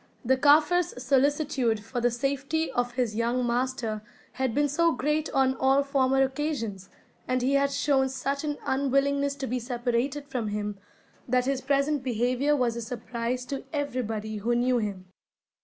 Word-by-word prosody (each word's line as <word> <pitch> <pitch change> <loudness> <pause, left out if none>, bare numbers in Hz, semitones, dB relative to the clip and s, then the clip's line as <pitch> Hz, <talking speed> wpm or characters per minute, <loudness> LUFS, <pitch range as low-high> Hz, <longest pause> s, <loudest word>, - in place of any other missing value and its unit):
The 260 +3 +4
Kaffir's 300 +3 +3
solicitude 270 -3 +2
for 245 +1 -3
the 245 - +3
safety 275 +6 -1
of 245 -1 -1
his 240 -4 -1
young 240 +2 0
master 240 -3 -1 0.3
had 260 -3 -2
been 290 0 +3
so 335 +4 +2
great 300 +5 0
on 265 -1 +2
all 270 +1 +3
former 270 -1 +2
occasions, 265 -9 -3 0.4
and 255 0 0
he 265 +2 +2
had 280 0 +3
shown 275 -1 +2
such 275 +2 -2
an 295 -1 -2
unwillingness 280 +1 +1
to 275 - -4
be 250 0 -2
separated 245 +3 -2
from 250 -6 -3
him, 210 -1 -3 0.5
that 250 0 +2
his 270 -1 0
present 280 +1 +1
behaviour 255 +4 +1
was 245 -4 +1
a 235 - -4
surprise 240 +1 -4
to 275 +1 -5
everybody 225 -7 -2
who 235 +4 0
knew 245 +1 +2
him. 200 -4 -4
260 Hz, 160 wpm, -27 LUFS, 240-280 Hz, 0.5 s, The